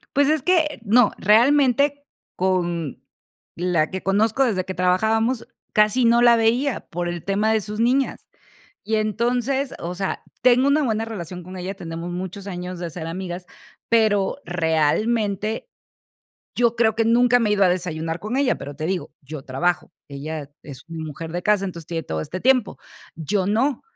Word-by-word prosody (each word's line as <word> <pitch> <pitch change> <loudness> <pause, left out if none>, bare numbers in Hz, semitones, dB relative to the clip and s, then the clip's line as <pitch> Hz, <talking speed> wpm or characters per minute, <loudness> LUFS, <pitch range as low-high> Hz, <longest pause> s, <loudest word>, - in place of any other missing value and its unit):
Pues, 285 +1 +4
es 310 -1 +2
que, 315 -3 +2
no, 235 +3 +4
realmente 280 +5 +3 0.3
con 175 -5 -1 0.5
la 175 -3 +1
que 190 0 -5
conozco 220 +7 +2
desde 190 -7 0
que 190 - -4
trabajábamos, 220 +7 +1 0.3
casi 215 +4 +3
no 235 +1 +5
la 240 -1 +7
veía, 235 +4 +1
por 175 +1 -3
el 175 -1 -4
tema 205 +3 +1
de 220 - +2
sus 210 +1 -6
niñas. 255 +4 +1 0.6
Y 220 - -1
entonces, 245 +5 0
o 170 +1 -4
sea, 195 +1 -3 0.2
tengo 250 +2 +5
una 295 +2 +3
buena 225 -3 0
relación 180 -5 -7
con 185 +2 -9
ella, 185 +2 -5
tenemos 170 -2 -6
muchos 185 +2 -6
años 180 -1 -5
de 175 -1 -4
ser 165 0 -6
amigas, 180 +1 -5 0.4
pero, 215 -3 +2
realmente, 200 - 0 0.9
yo 235 -1 +2
creo 220 -2 +2
que 225 0 +1
nunca 245 +2 +4
me 225 -3 +1
he - - +3
ido 200 -1 +3
a 185 - +5
desayunar 165 -2 -2
con 215 +7 -3
ella, 275 -2 +2
pero 140 +1 -8
te 155 +2 -4
digo, 160 -4 -2
yo 140 0 -8
trabajo, 175 +8 -1 0.2
ella 145 +1 -6
es 135 -3 -11
una 165 -1 -6
mujer 160 +1 -7
de 175 +1 -3
casa, 205 0 +2
entonces 170 -4 -7
tiene 165 -1 -3
todo 80 - -3
este 185 - -5
tiempo. 255 -3 +2 0.4
Yo 185 +4 -1
no. 235 +6 +1
200 Hz, 175 wpm, -22 LUFS, 175-235 Hz, 0.9 s, la